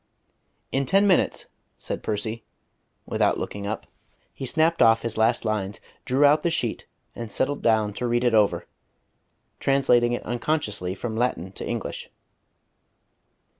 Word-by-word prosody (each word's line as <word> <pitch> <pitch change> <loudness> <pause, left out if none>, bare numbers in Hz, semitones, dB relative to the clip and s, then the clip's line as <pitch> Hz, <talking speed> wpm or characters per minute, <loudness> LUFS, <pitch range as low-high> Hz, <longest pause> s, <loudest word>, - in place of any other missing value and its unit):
"In 135 0 0
ten 195 +7 +4
minutes," 190 -3 +2 0.3
said - - -5
Percy, 110 +2 -3 0.6
without - - +1
looking 100 0 -5
up. 110 - -4 0.5
He 135 - -6
snapped 160 +4 +2
off 115 0 +5
his 115 -1 -2
last 115 +2 +2
lines, 105 -2 -2 0.3
drew 135 +3 +3
out 150 +2 +5
the 170 - +1
sheet, 120 -9 -2 0.3
and 115 -2 -6
settled 145 +6 -1
down 110 -2 +2
to 125 - -3
read 120 +1 +1
it 120 -2 +2
over, 105 -2 +3 0.9
translating 125 -3 +3
it 120 - -3
unconsciously 120 - -1
from 110 +1 -5
Latin 110 -6 -1
to - - -6
English. - - -4
120 Hz, 140 wpm, -25 LUFS, 110-135 Hz, 0.9 s, off